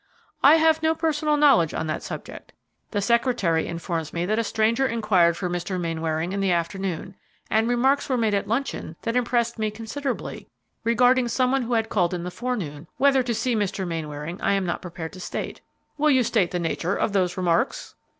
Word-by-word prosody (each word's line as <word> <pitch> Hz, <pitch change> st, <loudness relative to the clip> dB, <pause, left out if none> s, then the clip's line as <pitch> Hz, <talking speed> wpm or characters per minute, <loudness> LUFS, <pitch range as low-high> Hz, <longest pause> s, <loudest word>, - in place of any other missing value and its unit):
"I 290 Hz, +3 st, +8 dB
have 320 Hz, 0 st, +3 dB
no 320 Hz, 0 st, +2 dB
personal 305 Hz, -2 st, +1 dB
knowledge 275 Hz, -, +4 dB
on -, -, -2 dB
that 155 Hz, -1 st, -3 dB
subject. -, -, -8 dB, 0.4 s
The 205 Hz, -2 st, -1 dB
secretary 235 Hz, -8 st, +1 dB
informs 165 Hz, -2 st, -4 dB
me 170 Hz, +1 st, -1 dB
that 215 Hz, +4 st, 0 dB
a -, -, +1 dB
stranger 225 Hz, +4 st, +1 dB
inquired 195 Hz, -8 st, +2 dB
for 185 Hz, -, -2 dB
Mr. 175 Hz, +1 st, -3 dB
Mainwaring 165 Hz, 0 st, -2 dB
in 200 Hz, -, -2 dB
the 195 Hz, -1 st, +1 dB
afternoon, 185 Hz, +2 st, -2 dB, 0.4 s
and 220 Hz, +2 st, +2 dB
remarks 265 Hz, +4 st, +2 dB
were 260 Hz, -, +1 dB
made 220 Hz, -3 st, +1 dB
at 200 Hz, -, 0 dB
luncheon, 230 Hz, -, -2 dB
that 230 Hz, +1 st, -2 dB
impressed 235 Hz, -1 st, 0 dB
me 215 Hz, -1 st, 0 dB
considerably, 230 Hz, +5 st, -5 dB, 0.4 s
regarding 245 Hz, +2 st, +3 dB
some 250 Hz, +2 st, +1 dB
one 270 Hz, 0 st, +2 dB
who 240 Hz, 0 st, -2 dB
had 225 Hz, -1 st, +1 dB
called 180 Hz, -3 st, +1 dB
in 175 Hz, -, -4 dB
the 180 Hz, -, -5 dB
forenoon, 180 Hz, -9 st, -4 dB
whether 270 Hz, 0 st, +4 dB
to 240 Hz, -2 st, -2 dB
see 235 Hz, +2 st, 0 dB
Mr. 195 Hz, -3 st, -1 dB
Mainwaring 160 Hz, +1 st, -5 dB
I -, -, +2 dB
am 195 Hz, -1 st, 0 dB
not 175 Hz, -, -2 dB
prepared 170 Hz, -2 st, -7 dB
to 185 Hz, -, -10 dB
state." -, -, -5 dB, 0.4 s
"Will 305 Hz, +1 st, +4 dB
you 260 Hz, -3 st, +4 dB
state 215 Hz, -6 st, +1 dB
the 180 Hz, -, -2 dB
nature 170 Hz, +2 st, -1 dB
of 210 Hz, -, -1 dB
those 185 Hz, -2 st, +1 dB
remarks?" 175 Hz, -2 st, 0 dB
210 Hz, 200 wpm, -24 LUFS, 175-245 Hz, 0.4 s, I